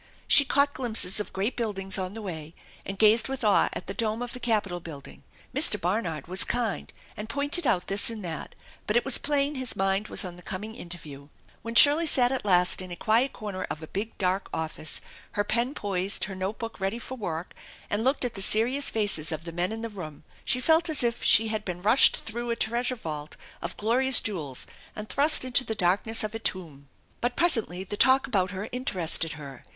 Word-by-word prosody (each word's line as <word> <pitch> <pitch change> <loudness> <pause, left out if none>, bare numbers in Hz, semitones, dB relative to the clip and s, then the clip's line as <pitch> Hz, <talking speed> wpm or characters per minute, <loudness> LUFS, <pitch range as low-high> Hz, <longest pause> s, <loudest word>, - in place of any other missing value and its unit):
She 285 - +8
caught 285 +1 +1
glimpses 220 -7 0
of 210 - -5
great 200 +6 -2
buildings 195 -5 -1
on 185 +2 -5
the 225 - -7
way, 160 -4 -7 0.3
and 195 - -5
gazed 220 +2 +4
with 270 -2 -5
awe 210 -2 +3
at - - -6
the - - -6
dome 225 0 -2
of 245 - -6
the 250 - -3
Capitol 210 -7 -1
building. 150 -5 -11 0.3
Mr. 270 -7 +3
Barnard 175 -4 -2
was 185 +2 +1
kind 235 -5 -3 0.2
and 210 +2 -8
pointed 285 +3 0
out 180 - +1
this 195 +3 +1
and 220 -4 -7
that, 165 -2 -7 0.3
but 210 - -1
it 240 - 0
was 270 - +5
plain 285 0 0
his 260 -3 -4
mind 195 +2 0
was 220 - +5
on 175 -1 -8
the - - -13
coming 210 +4 -7
interview. 155 - -10 0.3
When 230 0 -7
Shirley 300 +5 +8
sat 250 -4 +3
at 265 - -2
last 180 -2 +2
in 185 - -8
a 175 - -6
quiet 230 +8 +2
corner 205 -4 -6
of 155 - -6
a - - -8
big 215 +6 -5
dark 185 0 -1
office, 160 -1 -3 0.3
her 205 - 0
pen 235 +6 -1
poised, 195 -1 -2
her 200 - -4
note 190 +3 -4
book 230 -2 -7
ready 195 +4 -2
for 255 +2 -7
work, 175 -7 -5 0.3
and 205 +2 -2
looked 265 +1 +1
at 245 - -3
the 195 - -4
serious 240 +8 +2
faces 200 -7 +2
of 160 0 -5
the 170 - -7
men 175 +3 -2
in 225 +1 -6
the - - -2
room, 165 -9 -9 0.2
she 255 - 0
felt 320 +5 +2
as 305 -5 -1
if 235 0 -1
she 220 +1 +5
had 215 -1 -3
been 180 -3 -5
rushed 225 +6 +5
through 235 +2 -5
a 235 - 0
treasure 240 +3 -1
vault 155 -8 -7 0.2
of 170 - -6
glorious 250 +4 +4
jewels 155 - -4 0.3
and 210 0 -8
thrust 290 -1 +3
into 255 0 +2
the 220 - -4
darkness 205 +5 +1
of 215 0 -4
a 225 - -5
tomb. 155 -10 -2 0.3
But 245 +1 -1
presently 225 - +2
the 205 +2 -7
talk 265 +3 +4
about 190 -8 0
her 195 +3 -6
interested 180 - +2
her. 140 -4 -10
210 Hz, 215 wpm, -26 LUFS, 180-245 Hz, 0.3 s, She